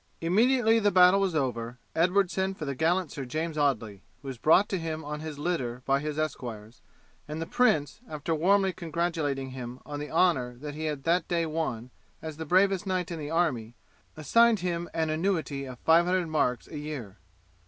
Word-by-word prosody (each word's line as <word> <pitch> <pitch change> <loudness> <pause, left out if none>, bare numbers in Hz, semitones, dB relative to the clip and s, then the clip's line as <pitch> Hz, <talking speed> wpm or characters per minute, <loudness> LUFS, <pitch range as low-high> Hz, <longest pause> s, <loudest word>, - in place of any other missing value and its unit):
Immediately 225 +6 +3
the 205 -1 +3
battle 185 0 +6
was 190 -4 0
over, 120 -4 -2 0.2
Edward 180 +3 +3
sent 190 0 -1
for 155 - -5
the 140 - -2
gallant 165 +4 +1
Sir 140 - -5
James 155 +5 -3
Audley, 115 -9 0 0.2
who 135 - -6
was 130 -3 -7
brought 180 - +5
to 190 - -1
him 160 -1 -4
on 150 0 -4
his 155 -1 -6
litter 130 -7 -2
by 135 0 +2
his 150 +1 -4
esquires, 120 -7 -5 0.5
and 150 +1 -5
the 165 - -3
prince, 165 -5 +1
after 155 +2 -3
warmly 190 +4 +3
congratulating 160 -6 -2
him 125 -1 -7
on 145 -1 -6
the 150 - -5
honour 140 -8 +2
that 145 +4 -7
he 155 +2 -5
had 150 -3 -3
that 170 +1 +1
day 170 -1 0
won 155 -7 -3 0.3
as 155 -2 -7
the 160 - -5
bravest 195 +3 +3
knight 185 -2 -1
in 165 - -4
the 145 -1 -5
army, 130 -9 0 0.4
assigned 225 - +4
him 175 -1 -2
an 160 -1 -1
annuity 155 -5 -1
of 130 -1 -8
five 165 +6 +4
hundred 180 -2 0
marks 125 -6 0
a 150 - -7
year. 135 -10 -7
155 Hz, 195 wpm, -28 LUFS, 140-180 Hz, 0.5 s, battle